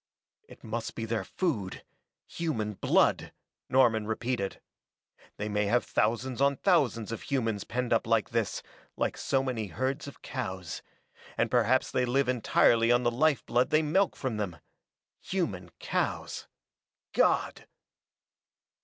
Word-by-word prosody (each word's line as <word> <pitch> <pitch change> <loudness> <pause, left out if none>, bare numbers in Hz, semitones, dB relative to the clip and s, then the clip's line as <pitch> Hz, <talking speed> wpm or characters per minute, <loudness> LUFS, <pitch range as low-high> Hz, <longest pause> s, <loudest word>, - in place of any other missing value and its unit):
"It - - -15
must 115 +1 -4
be 115 - -3
their 115 0 -1
food 115 - -2 0.4
human 115 -11 -2
blood!" - - +2 0.4
Norman 115 -5 +3
repeated. 110 -2 -2 0.8
"They 105 - -3
may 105 0 0
have 120 +4 +2
thousands 120 +4 0
on 140 0 +4
thousands 130 - +2
of 115 - -4
humans 115 -7 -1
penned 125 0 -1
up 115 - +1
like 115 -2 +2
this, 115 -3 -1 0.3
like - - 0
so 135 -1 0
many 120 -5 -2
herds 130 - -2
of 140 - -11
cows, 95 - -5 0.6
and - - +1
perhaps 125 +1 +3
they 125 - +1
live 135 +2 +1
entirely 115 -1 +3
on 120 +1 +4
the 120 - +2
life 140 +3 +2
blood 125 +2 +2
they 155 +1 +3
milk 180 +6 +2
from 130 -5 -3
them. 95 -6 -3 0.6
Human 100 - -3
cows - - -2 0.7
God!" - - +1
120 Hz, 135 wpm, -29 LUFS, 110-135 Hz, 0.8 s, on